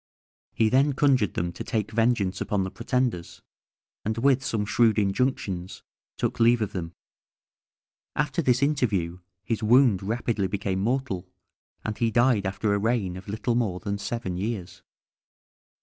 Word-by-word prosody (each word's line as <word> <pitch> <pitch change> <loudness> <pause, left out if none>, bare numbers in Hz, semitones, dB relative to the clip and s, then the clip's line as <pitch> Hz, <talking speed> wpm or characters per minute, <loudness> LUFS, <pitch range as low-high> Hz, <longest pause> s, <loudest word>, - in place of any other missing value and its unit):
He 110 - +3
then 135 +4 +3
conjured 130 - +2
them 85 0 -1
to - - -6
take 110 -2 -2
vengeance 110 -4 +1
upon 105 -3 0
the 95 - -4
pretenders, 125 -10 -2 0.6
and 110 +1 -2
with 135 +2 +3
some 105 -5 -1
shrewd 110 0 +3
injunctions, 100 -3 -1 0.3
took - - -2
leave 115 0 +4
of 105 - -4
them. 85 -2 -5 1.2
After 150 +4 0
this 130 -2 +2
interview 100 - 0 0.2
his 115 +1 -2
wound 115 -3 +5
rapidly 110 -1 -1
became 95 -1 -2
mortal, 100 -5 -1 0.6
and 110 -1 -3
he 115 - +2
died 120 -3 +3
after 100 +2 0
a 100 - +1
reign 105 -4 0
of 95 - -10
little 110 +4 -1
more 110 -7 0
than 100 +2 -3
seven 105 -3 -3
years. 100 -2 -4
110 Hz, 150 wpm, -26 LUFS, 95-120 Hz, 1.2 s, wound